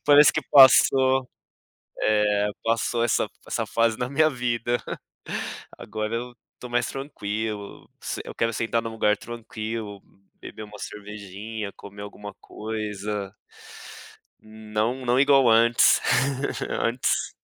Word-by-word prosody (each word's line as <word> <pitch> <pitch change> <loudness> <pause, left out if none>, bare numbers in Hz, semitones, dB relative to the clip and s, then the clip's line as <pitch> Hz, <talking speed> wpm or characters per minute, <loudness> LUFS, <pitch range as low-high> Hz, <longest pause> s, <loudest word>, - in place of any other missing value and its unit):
Parece 145 0 +7
que 155 - 0
passou. 130 -1 +6 0.7
É, 105 -1 +2 0.2
passou 115 +1 0
essa 120 - +1 0.2
essa - - -2
fase 115 -1 +1
na 125 0 -2
minha 155 +3 +3
vida. 120 -2 -1 1.0
Agora 110 +1 -4
eu 120 +1 -5 0.3
tô 125 - -8
mais 120 0 +1
tranquilo, 110 -6 -5 0.4
eu - - -7
quero 115 0 0
sentar 115 +1 0
num 115 - -5
lugar 105 -1 +2
tranquilo, 110 -3 -6 0.4
beber 110 - -9
uma 105 -1 -11
cervejinha, 105 +1 -7
comer 100 0 -11
alguma 105 0 -9
coisa 105 -2 -5 1.1
Não, 110 +3 -3
não 125 +1 +3
igual 135 -3 +5
antes 115 +1 +5 0.7
antes. 120 +2 0
115 Hz, 115 wpm, -25 LUFS, 105-120 Hz, 1.1 s, Parece